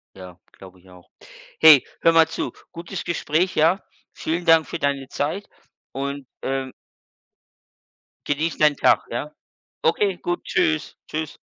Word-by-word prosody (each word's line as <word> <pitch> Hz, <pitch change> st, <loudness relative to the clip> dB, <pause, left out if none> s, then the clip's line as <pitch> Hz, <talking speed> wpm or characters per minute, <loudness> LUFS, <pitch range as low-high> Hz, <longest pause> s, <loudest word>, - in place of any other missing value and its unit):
Ja, 90 Hz, -2 st, -12 dB
glaube 95 Hz, -1 st, -15 dB
ich 95 Hz, +1 st, -21 dB
auch. 90 Hz, -1 st, -17 dB, 0.5 s
Hey, 155 Hz, -4 st, +8 dB, 0.2 s
hör 165 Hz, -, +5 dB
mal 165 Hz, -1 st, +5 dB
zu, 165 Hz, -, -4 dB, 0.2 s
gutes 170 Hz, +2 st, -7 dB
Gespräch, 170 Hz, +2 st, -1 dB
ja? 165 Hz, +6 st, +3 dB, 0.3 s
Vielen 170 Hz, +2 st, -3 dB
Dank 160 Hz, -3 st, +5 dB
für 170 Hz, -, -5 dB
deine 140 Hz, -2 st, -1 dB
Zeit 160 Hz, +8 st, -3 dB, 0.4 s
und, 140 Hz, 0 st, -5 dB, 0.2 s
ähm 135 Hz, -1 st, -3 dB, 1.6 s
Genieß 150 Hz, +2 st, -1 dB
deinen 150 Hz, -1 st, +4 dB
Tag, -, -, +3 dB
ja? 135 Hz, +6 st, -4 dB, 0.5 s
Okay, 185 Hz, +3 st, +1 dB
gut, 175 Hz, 0 st, -3 dB
tschüss, 155 Hz, -1 st, 0 dB
tschüss. 155 Hz, -1 st, -5 dB
155 Hz, 135 wpm, -22 LUFS, 135-165 Hz, 1.6 s, Hey